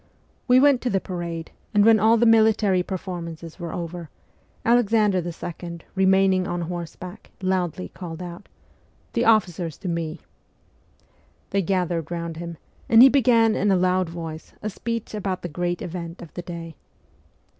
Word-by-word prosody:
We 250 0 +6
went 280 -2 +5
to 250 - -1
the 195 - +1
parade; 170 -3 -5 0.2
and 205 0 +5
when 225 -1 +6
all 220 +3 +5
the 235 - +3
military 220 -4 +4
performances 170 -3 -6
were 170 -2 -5
over, 170 -1 -6 0.6
Alexander 220 -4 +3
II., 170 0 -6
remaining 190 -1 +3
on 175 0 -2
horseback, 175 +3 -7
loudly 185 -2 -1
called 170 -3 -8
out, 175 +1 -8 0.3
' - - -37
The 235 - +1
officers 180 -7 +2
to - - -7
me! 165 -2 -3 0.6
' - - -37
They 200 - +2
gathered 175 -3 -1
round 170 -1 -4
him, 170 -1 -6 0.3
and 230 +1 +8
he 270 - +9
began, 230 -4 +4
in 205 - +1
a 195 - +4
loud 185 -1 +2
voice, 165 -2 -7
a 215 - -2
speech 230 +2 -4
about 195 -3 -3
the 175 - -3
great 175 +2 -2
event 170 -1 -6
of 170 - -13
the 175 - -5
day. 170 -2 -7
180 Hz, 160 wpm, -24 LUFS, 170-210 Hz, 0.6 s, he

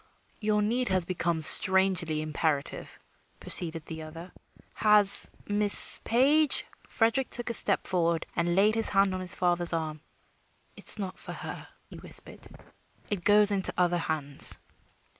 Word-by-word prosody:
"Your 210 -1 -3
need 240 +4 -3
has 185 -3 -2
become 170 -2 -5
strangely 180 -2 +3
imperative," 155 -2 -6 0.4
proceeded 165 -2 -3
the 160 -1 -10
other. 165 +3 -13 0.4
"Has 210 -2 +5 0.2
Miss 205 0 +7
Page 285 +5 0
" - - -31
Frederick 230 +3 -3
took 240 -1 -4
a - - -6
step - - +1
forward 170 -3 -3
and 170 0 -3
laid 205 +3 0
his 225 0 -1
hand 195 -1 -1
on 185 - -7
his 185 - -2
father's 175 -1 -3
arm. 155 -2 -7 0.7
"It - - -10
is - - +4
not 195 -3 -9
for - - -11
her," - - -11 0.2
he - - -13
whispered. - - -6 0.6
"It 195 -4 -6
goes 210 +1 +2
into 195 -2 -1
other 175 -1 -2
hands." 150 -4 -1
185 Hz, 150 wpm, -25 LUFS, 165-210 Hz, 0.7 s, Miss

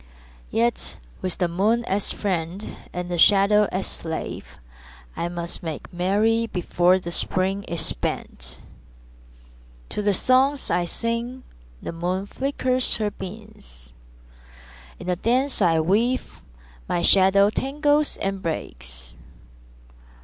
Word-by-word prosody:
Yet 115 - 0 0.2
with 185 - -2
the 180 - +2
moon 210 +7 +1
as 195 +1 0
friend 185 0 -3 0.2
and 180 0 -4
the 175 -1 -2
shadow 205 +2 +6
as 190 +1 -1
slave 160 -1 -4 0.7
I 170 - -2
must 170 -1 -4
make 160 -1 -6
merry 210 +6 +2
before 180 -1 +3
the 175 -2 -5
Spring 190 +3 0
is 165 -2 -1
spent. - - -4 1.3
To - - -2
the 205 -1 +2
songs 265 +6 +3
I 175 0 +2
sing 230 +7 -3 0.4
the - - -3
moon 180 +3 -2
flickers 255 +1 0
her 210 -2 -1
beams; 120 - -5 1.0
In - - -9
the 180 0 +1
dance 255 +7 +1
I 165 -2 +4
weave 225 +10 +1 0.5
my 175 - +1
shadow 200 +1 +6
tangles 290 +4 +1
and 195 -1 -2
breaks. - - -3
190 Hz, 120 wpm, -24 LUFS, 170-225 Hz, 1.3 s, shadow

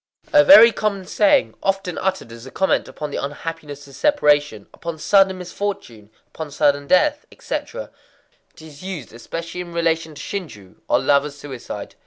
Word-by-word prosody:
A 295 -1 +7
very 255 -6 +9
common 200 -4 -2
saying,—often 195 - +1
uttered 190 -10 -2
as 115 +2 -11
a - - -8
comment 190 +7 0
upon 150 -1 -7
the - - -4
unhappiness 145 0 -7
of 140 - -15
separation, 145 - +2
upon 170 -1 -6
sudden 195 +3 +3
misfortune, 180 - -6 0.2
upon 160 -2 -7
sudden 145 -1 +1
death, 295 - +2
etc. - - -6 0.6
It - - -15
is 155 -2 -13
used 185 -11 -7
especially 165 +9 -6
in 175 -1 -9
relation 165 -2 -1
to - - -10
shinjū, 130 - -7
or - - +3
lovers' 140 0 +1
suicide. 135 -4 -8
165 Hz, 155 wpm, -21 LUFS, 145-195 Hz, 0.6 s, very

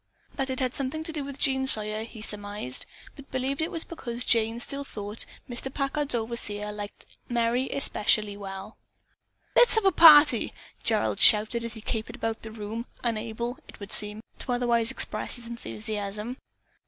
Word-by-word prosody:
That 270 -1 -2
it 260 - -2
had 255 -1 0
something 275 +4 -3
to 320 - -3
do 300 -2 -2
with 275 0 -7
Jean 265 -1 +2
Sawyer 215 -3 +4
he 225 -1 -10
surmised, 205 - -3 0.3
but 280 -1 -13
believed 260 +2 -2
that 315 - +1
it - - -7
was 330 -3 -3
because 245 -7 -2
Jane 225 0 +2
still 280 +3 0
thought 210 -4 -6 0.2
Mr. 250 +2 -4
Packard's 275 0 0
overseer 215 -3 -3
liked 205 0 -8 0.2
Merry 240 +2 +1
especially 210 -5 +1
well. 195 +1 -8 0.8
"Let's 485 - +6
have 445 -2 +2
a 385 - +6
party!" 305 -3 +7 0.3
Gerald - - +1
shouted 220 +2 +5
as 230 -1 -4
he 220 - -9
capered 225 +1 -3
about 225 -3 -3
the 220 - -8
room 220 +2 -6 0.2
unable, 235 +1 -2
it - - -14
would 200 0 -8
seem, 210 +1 +3 0.2
to 255 - -2
otherwise 240 -1 +2
express 260 - -2
his 240 -1 -6
enthusiasm. 215 0 -5
235 Hz, 170 wpm, -27 LUFS, 215-265 Hz, 0.8 s, party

